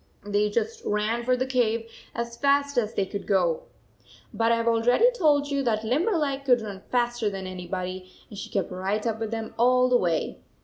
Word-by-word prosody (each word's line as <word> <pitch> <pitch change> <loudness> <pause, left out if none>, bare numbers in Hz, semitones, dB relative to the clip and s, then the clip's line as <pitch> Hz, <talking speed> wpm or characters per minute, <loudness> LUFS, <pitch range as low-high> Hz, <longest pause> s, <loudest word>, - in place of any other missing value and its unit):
They 205 0 +1
just 225 +1 -2
ran 215 +3 0
for 255 +1 +2
the 255 - 0
cave 230 -3 0 0.3
as 235 0 -3
fast 280 +2 +2
as 225 -3 0
they 195 - +1
could 200 +1 -6
go. 175 -5 +1 0.7
But 225 +2 +2
I - - +5
have 230 0 -2
already 245 - +4
told 300 -10 +2
you 280 0 +1
that 225 -4 0
Limberleg 285 - 0
could 250 -3 +4
run 200 -3 -7
faster 240 -3 +1
than 195 -1 -6
anybody 185 0 -5 0.2
and - - -11
she - - -7
kept 195 -2 -2
right 195 +4 -2
up 225 -1 -1
with 225 -1 -3
them 225 0 -5
all 250 +1 +4
the 250 - +5
way. 170 -7 -1
230 Hz, 195 wpm, -26 LUFS, 205-255 Hz, 0.7 s, I